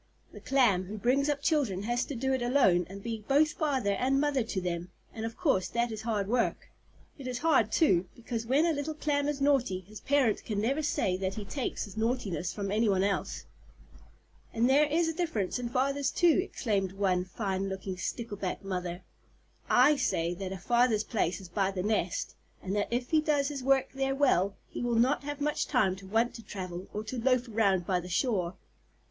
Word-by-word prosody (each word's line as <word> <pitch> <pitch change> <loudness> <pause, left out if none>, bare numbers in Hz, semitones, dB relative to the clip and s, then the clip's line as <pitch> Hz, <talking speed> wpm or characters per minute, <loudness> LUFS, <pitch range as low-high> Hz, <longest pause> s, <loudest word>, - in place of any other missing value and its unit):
The - - -10
Clam 230 -9 +3
who 210 +4 -7
brings 265 +6 +2
up 285 -1 -1
children 255 - +1
has 240 +3 0
to 285 - -6
do 265 +3 0
it 260 - 0
alone, 240 -9 +3
and 195 +1 -9
be 225 -2 -4
both 295 +3 +4
father 270 -9 0
and 260 +7 +1
mother 290 -2 +1
to 220 -3 -3
them, 175 -1 -3 0.2
and 225 0 -3
of 230 - -9
course 275 - +1
that 235 0 -1
is 215 -1 -5
hard 215 -3 -1
work. 240 +2 -1 0.5
It 265 - -7
is 250 -1 -2
hard, 265 -8 +3
too, 185 - +3
because 230 -1 -5
when 280 +6 +3
a 335 - +2
little 300 +1 -3
Clam 290 -1 0
is 295 -1 -2
naughty, 270 -9 +2
his 210 +4 -12
parent 270 -6 +2
can 210 -2 -2
never 265 +8 0
say 190 -10 0
that 190 0 -2
he 210 - -5
takes 255 +6 -3
his 205 +1 -12
naughtiness 215 - -1
from 200 -1 -4
any 215 +1 +2
one 190 -1 +2
else. 200 0 -2 1.1
"And 230 +1 +2
there 280 +3 +5
is 325 +3 +1
a 325 - -1
difference 310 - -1
in 240 -1 -3
fathers 275 +2 +1
too," 345 +1 +4
exclaimed 200 - -2
one 190 -2 +1
fine 195 0 -3
looking 190 0 -4
Stickleback 205 -2 -4
Mother. 180 -2 -4 0.7
"I 285 +4 +5
say 170 -10 0
that 190 +1 -5
a 190 - -4
father's 235 +2 +2
place 185 -7 -1
is 190 - -10
by 190 +2 0
the 190 -2 -3
nest, 205 -4 -1 0.3
and 195 +1 -2
that 205 - 0
if 245 +3 -2
he 315 -1 +4
does 290 -2 +1
his 285 -2 -5
work 270 0 +2
there 270 0 -1
well, 200 -9 +2
he - - -6
will 240 -1 0
not 255 +5 +2
have 290 0 -4
much 295 +1 -1
time 215 -9 +2
to 195 0 -12
want 225 +4 +1
to 230 - -9
travel, 185 -3 -6
or 210 - -4
to 230 +2 -5
loaf 255 0 +2
around 200 -5 +1
by 180 -1 +1
the 180 +1 -8
shore." 180 -2 0
230 Hz, 210 wpm, -30 LUFS, 195-270 Hz, 1.1 s, there